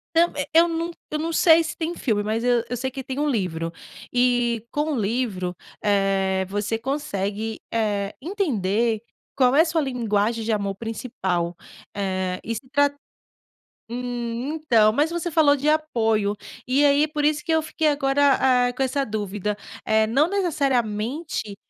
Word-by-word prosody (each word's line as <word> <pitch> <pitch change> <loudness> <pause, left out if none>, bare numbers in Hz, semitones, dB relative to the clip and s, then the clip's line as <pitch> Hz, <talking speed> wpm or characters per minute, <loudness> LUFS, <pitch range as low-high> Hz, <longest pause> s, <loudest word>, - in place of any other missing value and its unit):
Então, 340 +1 +5
eh, 285 - -2
eu 335 +1 +6
não 335 +1 -2 0.2
eu 305 - -1
não 330 +2 -2
sei 325 0 +5
se - - -4
tem 335 +1 -3
filme, 215 -9 0
mas 220 +3 -2
eu 245 -2 +3
eu 245 - -3
sei 260 +2 -2
que 265 +1 -6
tem 260 +1 -5
um 295 0 +1
livro. 170 - -2 0.4
E 245 -2 +2
com 300 +1 -1
o 255 - -1
livro, 200 -5 -2 0.3
eh, 195 -2 +1
você 205 +2 -1
consegue, 220 -5 -3
eh, 210 -3 -1
entender 235 - 0 0.3
qual 260 0 +3
é 320 - +8
a - - +1
sua 325 -1 0
linguagem 230 -4 0
de 225 - 0
amor 200 -2 -1
principal. 190 -6 -3 0.4
Eh, 185 -2 -2
estra 275 +5 0 1.0
Hum, 245 +2 -3
então, 235 -9 +3
mas 295 +6 +1
você 345 0 -2
falou 295 -2 +4
de 280 - -4
apoio. 225 -10 +1 0.3
E 275 +3 +3
aí, 290 +2 +4
por 295 -1 -2
isso 300 0 +2
que 345 - -6
eu 320 -1 +3
fiquei 315 0 0
agora, 270 -3 +3
eh, - - -3
com 270 - -2
essa 265 +2 0
dúvida. 210 -1 -3 0.3
Eh, 220 0 +3
não 275 +8 +2
necessariamente 270 - -1
245 Hz, 165 wpm, -23 LUFS, 210-295 Hz, 1.0 s, é